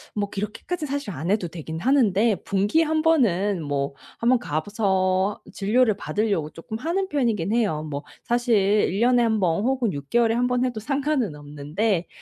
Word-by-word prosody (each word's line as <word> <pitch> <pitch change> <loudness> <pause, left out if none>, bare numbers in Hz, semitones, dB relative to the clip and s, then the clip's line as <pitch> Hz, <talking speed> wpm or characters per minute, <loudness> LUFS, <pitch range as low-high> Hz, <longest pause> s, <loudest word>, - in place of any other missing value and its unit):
뭐 205 -1 -1
그렇게까진 250 - -4
사실 280 -5 -3
안 160 +1 -4
해도 200 -3 +1
되긴 160 -1 -6
하는데 230 -5 +3
분기에 205 +11 +2
1 315 0 +1
번은 205 - +2
뭐 140 -2 -2 0.3
한번 240 +2 +3
가 155 -8 -2
봐서 190 0 0
진료를 215 +2 +2
받으려고 205 -8 -1
쪼끔 190 +6 -7
하는 350 +9 -2
편이긴 225 - 0
해요. 205 -10 +1
뭐 145 -1 -5 0.2
사실 240 0 +1
1 200 0 +2
년에 245 0 +4
1 220 -2 +1
번, 180 +2 +1
혹은 255 -4 +1
6 140 -3 -7
개월에 235 -1 +3
1 245 +2 +1
번 250 0 +1
해도 245 -3 -2
상관은 275 - -1
없는데 150 +7 -2
210 Hz, 310 characters per minute, -24 LUFS, 180-245 Hz, 0.3 s, 년에